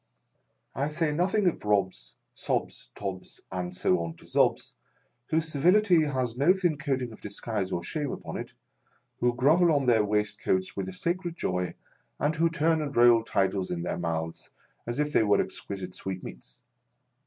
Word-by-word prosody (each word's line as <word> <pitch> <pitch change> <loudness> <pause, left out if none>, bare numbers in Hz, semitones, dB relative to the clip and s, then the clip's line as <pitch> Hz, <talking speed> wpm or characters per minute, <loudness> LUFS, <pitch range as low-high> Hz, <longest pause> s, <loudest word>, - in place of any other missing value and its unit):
" - - -47 0.3
I 140 +3 0
say 155 0 0
nothing 190 +6 +1
of 175 - +1
Robbs, 95 -12 0 0.2
Sobbs, - - -3
Tobbs, 95 -2 -6
and 90 -1 -4
so 90 0 +2
on 85 -1 -4
to - - -17
Zobbs, - - +1 0.6
whose 160 0 0
servility 175 +3 +4
has 130 -5 -1
no 145 +8 +5
thin 175 -6 0
coating 135 -4 -1
of 110 - -13
disguise 100 -1 -3
or 85 - -2
shame 145 - -3
upon - - -6
it, - - -7 0.7
who 120 - +3
grovel 160 +7 +4
on 140 -3 +2
their 115 -4 +4
waistcoats 105 -2 0
with 95 -1 -3
a - - -8
sacred 175 - -2
joy, 90 0 -2 0.4
and 150 +2 0
who 165 +1 +3
turn 160 0 +1
and 145 -2 -4
roll 120 -1 +6
titles 95 -3 0
in 85 -1 -3
their - - -3
mouths 80 -1 -3 0.4
as 120 - -3
if 150 0 0
they - - +5
were 105 -2 +3
exquisite 95 -2 -4
'sweetmeats. 90 -11 -7
120 Hz, 170 wpm, -28 LUFS, 95-155 Hz, 0.7 s, roll